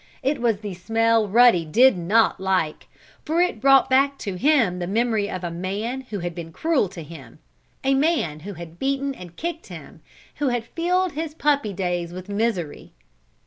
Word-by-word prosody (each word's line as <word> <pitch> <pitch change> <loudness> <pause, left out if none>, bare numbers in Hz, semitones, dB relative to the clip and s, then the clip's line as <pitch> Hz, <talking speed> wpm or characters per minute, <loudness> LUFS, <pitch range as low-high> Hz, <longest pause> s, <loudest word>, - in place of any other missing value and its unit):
It 275 -1 0
was 225 -4 +1
the 205 -3 -5
smell 225 +4 +1
Ruddy 230 -4 +5
did 230 +10 +4
not 195 +6 +2
like, 185 -5 -1 0.4
for 320 +2 -1
it 355 -11 +1
brought 270 0 +6
back 275 +1 +3
to 200 - -2
him 230 -5 +2
the 175 - -3
memory 220 0 0
of 185 -1 -5
a 175 - -3
man 200 +9 -3
who 210 - -4
had 175 0 -4
been 165 -1 -8
cruel 305 - 0
to 175 -3 -9
him 160 +2 -12 0.5
a 270 +1 +2
man 270 - +1
who 200 +6 -8
had 170 0 -10
beaten 275 +1 -1
and 180 -8 -12
kicked 335 0 -5
him - - -11 0.4
who 290 - 0
had 245 -2 -1
filled 360 +6 0
his 310 0 -5
puppy 285 -8 +1
days 175 -2 -3
with 185 +2 -9
misery. 200 -7 -2
220 Hz, 185 wpm, -23 LUFS, 180-275 Hz, 0.5 s, brought